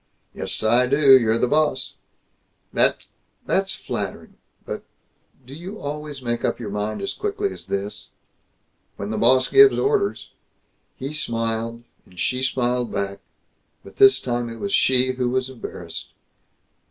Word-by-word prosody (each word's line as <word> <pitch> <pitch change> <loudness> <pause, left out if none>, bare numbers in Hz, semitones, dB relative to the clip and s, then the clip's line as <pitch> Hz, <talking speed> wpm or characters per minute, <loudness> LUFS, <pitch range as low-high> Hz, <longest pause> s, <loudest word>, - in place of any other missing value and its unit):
"Yes. - - -3
I 120 +3 +4
do. 140 +2 +2 0.2
You're 115 -3 +3
the 120 - +2
boss." 150 -1 +1 0.8
"That's - - +2 0.4
that's - - 0
flattering, - - -5 0.3
but - - -5 0.6
Do 130 - -11
you 185 +8 -8
always 145 -1 -6
make 120 -1 -2
up - - 0
your 110 -4 -5
mind 105 - -3
as 195 - -2
quickly 405 -1 -2
as - - -9
this?" 100 +1 -4 0.9
"When 100 +1 -4
the 110 - -2
boss 130 +2 +4
gives 410 0 +7
orders!" 415 -1 0 0.7
He 135 +2 -5
smiled, 115 -4 -2 0.2
and 90 -1 -15
she 125 0 0
smiled 125 -2 0
back, 100 0 -3 0.6
but - - -14
this 400 0 +7
time 120 -1 -2
it 115 - -8
was 200 +7 -3
she 130 0 +3
who 125 -1 -1
was 130 +1 -1
embarrassed. 125 - -7
125 Hz, 145 wpm, -23 LUFS, 115-150 Hz, 0.9 s, gives